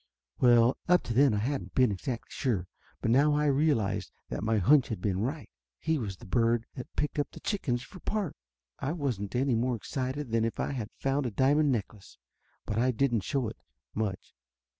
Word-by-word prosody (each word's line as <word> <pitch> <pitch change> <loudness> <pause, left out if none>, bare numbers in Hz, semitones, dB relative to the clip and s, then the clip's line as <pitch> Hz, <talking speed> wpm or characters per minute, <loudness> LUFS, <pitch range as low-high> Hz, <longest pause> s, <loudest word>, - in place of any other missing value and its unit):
Well, 120 0 +5
up 180 0 +5
to 120 - -3
then 135 -2 +5
I - - 0
hadn't 130 +7 -2
been 125 -4 +4
exactly 115 +5 -4
sure, 110 - -1 0.4
but 115 - +2
now 145 +4 +4
I 150 0 +2
realized 140 -7 +1 0.2
that - - -3
my 110 0 +2
hunch 130 +8 +5
had 110 - -4
been 95 0 -1
right. 135 +8 -2 0.3
He 160 -2 0
was 100 -6 -4
the - - -13
bird 115 +3 +2
that 125 - -9
picked 150 0 0
the - - -9
chickens 125 - -1
for 185 - -12
parts! 205 -3 -3 0.4
I 140 +4 -1
wasn't 125 - -3
any 130 +1 +2
more 120 +2 +1
excited 130 +3 -4
than 115 -1 +2
if 115 - -2
I - - -1
had 120 -6 -4
found 135 0 0
a - - -1
diamond 140 +6 +3
necklace. 105 - -4 0.5
But 105 - -1
I 125 +2 +3
didn't 120 -2 +1
show 130 +5 -1
it 110 - -7 0.4
much. 105 -4 -3
125 Hz, 195 wpm, -29 LUFS, 110-140 Hz, 0.5 s, Well